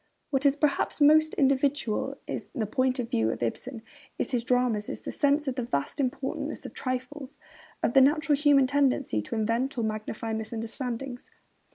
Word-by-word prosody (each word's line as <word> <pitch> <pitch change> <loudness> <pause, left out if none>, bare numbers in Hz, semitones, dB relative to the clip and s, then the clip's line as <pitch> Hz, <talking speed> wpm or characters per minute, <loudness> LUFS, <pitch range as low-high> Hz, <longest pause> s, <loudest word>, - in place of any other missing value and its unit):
What 275 0 +3
is 275 - +3
perhaps 295 0 0
most 310 +1 +5
individual 275 -4 +1
in - - -4
the 220 - 0
point 255 +5 +1
of 240 -2 -4
view 110 0 +2
of 115 - -3
Ibsen 225 - -4 0.3
in - - 0
his 245 -3 -1
dramas 245 -4 +1
is - - -7
his - - -5
sense 290 +1 +2
of 265 - 0
the 255 - -3
vast 230 - -2
importance 265 0 -3
trifles, 255 +2 -5 0.5
of - - +1
the 270 - +7
natural 295 +2 +4
human 285 -2 +4
tendency 275 - +1
to 105 - -6
invent 230 +5 0
or 235 - 0
magnify 215 +1 -3
misunderstandings. 230 +3 -5
255 Hz, 170 wpm, -27 LUFS, 230-280 Hz, 0.5 s, the